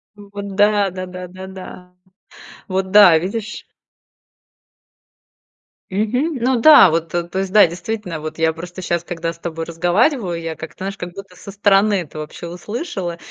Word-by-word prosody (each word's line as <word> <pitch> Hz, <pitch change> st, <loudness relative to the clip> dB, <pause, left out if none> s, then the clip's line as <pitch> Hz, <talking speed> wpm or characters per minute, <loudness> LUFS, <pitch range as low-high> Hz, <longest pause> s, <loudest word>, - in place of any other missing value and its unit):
Вот 200 Hz, -1 st, -8 dB
да, 205 Hz, -1 st, +3 dB
да-да, 185 Hz, 0 st, -7 dB
да-да. 185 Hz, 0 st, -10 dB, 0.8 s
Вот, 190 Hz, 0 st, -2 dB
да, 185 Hz, -5 st, +8 dB
видишь? 210 Hz, +5 st, -5 dB, 2.3 s
Мгм, 250 Hz, -, 0 dB
ну 250 Hz, -1 st, +2 dB
да, 295 Hz, -, +8 dB
вот-то, 165 Hz, +1 st, -1 dB
то 175 Hz, +2 st, -5 dB
есть, 195 Hz, -1 st, -3 dB
да, 210 Hz, -3 st, +7 dB
действительно, 180 Hz, 0 st, -5 dB
вот 155 Hz, +1 st, -7 dB
я 160 Hz, 0 st, +2 dB
просто 175 Hz, +3 st, -9 dB
щас, 170 Hz, -1 st, -1 dB
когда 165 Hz, -1 st, -4 dB
с 170 Hz, -, -18 dB
тобой 165 Hz, -1 st, -5 dB
разговариваю, 175 Hz, -, 0 dB
я 165 Hz, -1 st, -5 dB
как-то, 160 Hz, +1 st, -10 dB
знаешь, 195 Hz, 0 st, -5 dB
как 175 Hz, 0 st, -7 dB
будто 195 Hz, -1 st, -11 dB
со 200 Hz, -, -10 dB
стороны 200 Hz, +1 st, +3 dB
это 155 Hz, -2 st, -9 dB
вообще 155 Hz, +3 st, -8 dB
услышала 180 Hz, -, -5 dB
185 Hz, 150 wpm, -19 LUFS, 170-205 Hz, 2.3 s, да